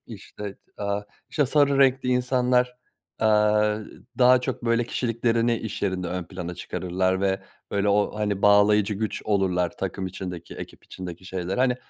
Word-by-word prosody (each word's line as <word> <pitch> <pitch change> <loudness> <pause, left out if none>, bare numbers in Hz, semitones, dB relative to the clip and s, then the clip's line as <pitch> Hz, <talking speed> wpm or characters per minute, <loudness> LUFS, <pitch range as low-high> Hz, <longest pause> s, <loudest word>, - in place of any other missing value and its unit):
İşte, 100 -1 -9 0.2
aaa, 100 0 -1 0.3
işte, 145 -3 +2
sarı 140 0 +3
renkli 135 -1 +4
insanlar, 125 0 +2 0.4
aaa, 105 -1 +3 0.4
daha 125 0 +6
çok, 125 - -4
böyle, 115 0 +2
kişiliklerini 115 0 0
iş 110 -2 -6
yerinde 95 -3 -1
ön 90 0 -3
plana 90 -1 -6
çıkarırlar 95 +2 -1
ve, 95 -1 +1 0.3
böyle, 100 0 +1
o, 100 0 +2
hani, 100 -2 -1
bağlayıcı 105 0 +5
güç 110 +1 -3
olurlar 95 -4 +1
takım 95 0 -3
içindeki, 90 -2 -7
ekip - - -10
içindeki 90 0 -8
şeyler. 95 +1 -3
Hani, 125 -1 +3
105 Hz, 145 wpm, -25 LUFS, 95-120 Hz, 0.4 s, daha